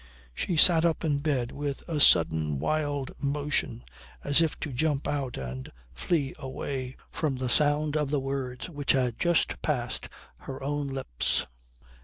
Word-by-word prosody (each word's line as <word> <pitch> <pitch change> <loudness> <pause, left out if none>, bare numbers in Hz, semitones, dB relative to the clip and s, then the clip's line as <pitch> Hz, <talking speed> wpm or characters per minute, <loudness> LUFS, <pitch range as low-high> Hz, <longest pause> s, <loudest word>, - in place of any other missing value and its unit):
She 165 - -2
sat 165 0 +7
up 165 -1 +1
in 145 -3 +1
bed 140 -5 -1
with 145 -1 -5
a 160 -3 -2
sudden 80 - +4
wild 145 - -1
motion 145 - -1 0.4
as 145 +3 +4
if 160 -2 0
to 145 - -4
jump 145 +1 0
out 135 -4 -2
and 65 0 -6 0.2
flee 140 - -1
away 130 -1 -5 0.2
from 150 -4 -1
the 130 0 -3
sound 150 +2 +3
of 150 -2 0
the 145 0 +1
words 135 -2 -4
which 145 -5 0
had 125 -4 0
just 175 -1 +1
passed 125 -6 -2 0.3
her 135 0 -8
own 145 +1 -2
lips. 135 - 0
140 Hz, 155 wpm, -28 LUFS, 130-150 Hz, 0.4 s, sat